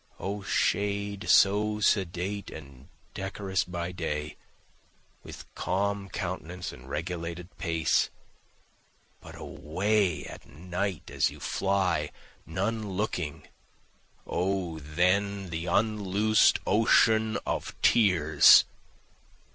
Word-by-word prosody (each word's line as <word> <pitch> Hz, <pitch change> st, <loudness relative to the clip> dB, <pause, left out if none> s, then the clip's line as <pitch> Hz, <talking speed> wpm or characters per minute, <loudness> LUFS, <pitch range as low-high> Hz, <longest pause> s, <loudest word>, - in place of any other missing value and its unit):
O 100 Hz, +1 st, -4 dB
shade 100 Hz, +1 st, -1 dB
so 105 Hz, +2 st, +4 dB
sedate 100 Hz, 0 st, 0 dB
and 70 Hz, -3 st, -12 dB, 0.3 s
decorous 95 Hz, 0 st, -2 dB
by 85 Hz, 0 st, -5 dB
day, 75 Hz, -4 st, -4 dB, 0.9 s
with -, -, -10 dB
calm 100 Hz, +1 st, -2 dB
countenance 90 Hz, 0 st, -5 dB
and 65 Hz, +1 st, -13 dB
regulated 85 Hz, +2 st, -5 dB
pace, 80 Hz, -3 st, +1 dB, 1.1 s
But -, -, -12 dB
away 95 Hz, +2 st, -1 dB
at -, -, -11 dB
night 90 Hz, +2 st, -4 dB
as -, -, +2 dB
you -, -, -12 dB
fly, 95 Hz, -1 st, 0 dB, 0.4 s
none 105 Hz, +5 st, -2 dB
looking 90 Hz, -6 st, -3 dB, 0.8 s
O 90 Hz, -3 st, -2 dB
then 90 Hz, +5 st, 0 dB
the 85 Hz, +2 st, -4 dB
unloosen'd 105 Hz, +2 st, +3 dB
ocean, 110 Hz, +1 st, +3 dB
Of -, -, -4 dB
tears! 85 Hz, -9 st, +6 dB
95 Hz, 90 wpm, -28 LUFS, 85-100 Hz, 1.1 s, tears